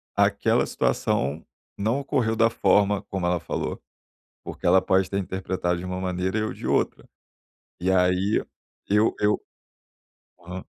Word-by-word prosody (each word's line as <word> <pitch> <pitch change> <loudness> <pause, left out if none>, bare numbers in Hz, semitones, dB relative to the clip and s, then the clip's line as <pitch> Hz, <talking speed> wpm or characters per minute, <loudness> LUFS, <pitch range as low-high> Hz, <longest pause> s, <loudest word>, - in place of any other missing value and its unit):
aquela - - +2
situação 70 +5 0 0.3
não 110 +7 0
ocorreu 115 -5 0
da 115 0 +4
forma 100 -1 +2
como 95 -2 -4
ela 90 -1 +1
falou. - - -4 0.6
Porque - - -6
ela 95 0 +5
pode 95 0 +2
ter 100 - -2
interpretado 95 -2 -2
de 90 - -6
uma 90 0 -3
maneira 95 +2 -2
e - - +1
eu 110 - -2
de - - -8
outra. - - 0 0.7
E 95 +2 +1
aí, 90 +2 +2 0.5
eu 105 +2 +3
eu 105 0 +2 1.0
Aham. 90 +2 -8
95 Hz, 145 wpm, -25 LUFS, 90-105 Hz, 1.0 s, ela